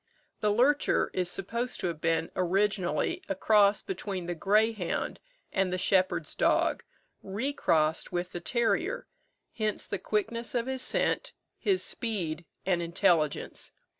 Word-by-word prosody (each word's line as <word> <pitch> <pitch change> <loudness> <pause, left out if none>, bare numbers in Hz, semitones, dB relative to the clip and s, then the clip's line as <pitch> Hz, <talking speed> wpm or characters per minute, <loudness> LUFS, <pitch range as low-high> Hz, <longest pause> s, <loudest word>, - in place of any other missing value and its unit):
The 210 - +2
lurcher 265 +7 +3
is 180 -1 0
supposed 235 +7 -2
to - - -2
have 165 -2 -4
been 165 0 +1
originally 185 -2 +1
a 195 - 0
cross 205 +1 +4
between 200 - -4
the 175 - -2
greyhound 210 +2 +1 0.3
and 190 -1 +1
the 185 - 0
shepherd's 185 -3 +1
dog, - - +2 0.4
re 225 +9 -2
crossed 160 - +1
with 175 +1 -2
the 175 - -5
terrier; 235 - 0 0.5
hence 215 -2 -1
the 200 - -3
quickness 230 +3 -2
of 235 -1 +1
his 260 0 -2
scent, - - 0 0.3
his 385 -2 +2
speed, 175 -8 -2 0.2
and 180 -2 +1
intelligence. 170 -2 0
195 Hz, 135 wpm, -29 LUFS, 175-225 Hz, 0.5 s, cross